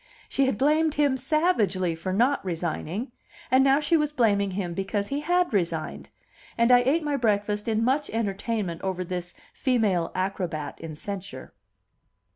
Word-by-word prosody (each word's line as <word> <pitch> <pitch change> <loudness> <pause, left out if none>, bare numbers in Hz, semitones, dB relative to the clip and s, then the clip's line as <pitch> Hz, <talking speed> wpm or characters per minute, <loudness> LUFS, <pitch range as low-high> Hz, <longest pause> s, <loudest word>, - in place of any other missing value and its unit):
She 275 -1 +1
had 260 - 0
blamed 305 +4 +2
him 285 -2 +3
savagely 250 - +1
for 170 +3 -4
not 245 +9 +2
resigning, 175 - -3 0.4
and 260 +1 +6
now 275 +1 +4
she 305 +3 +2
was 300 -2 +1
blaming 205 -7 +2
him 185 -2 -3
because 200 +2 -2
he 280 - -1
had 350 0 +1
resigned; 170 -5 -2 0.5
and 235 +1 +4
I 245 - +8
ate 275 +7 +1
my 295 -2 0
breakfast 210 -3 0
in 225 0 +1
much 275 +5 +1
entertainment 205 -4 -2
over 185 -1 -2
this 180 0 -5 0.2
female 210 -10 +1
acrobat 180 -6 -3
in 160 -2 -7
censure. 195 +3 -7
210 Hz, 155 wpm, -26 LUFS, 185-275 Hz, 0.5 s, I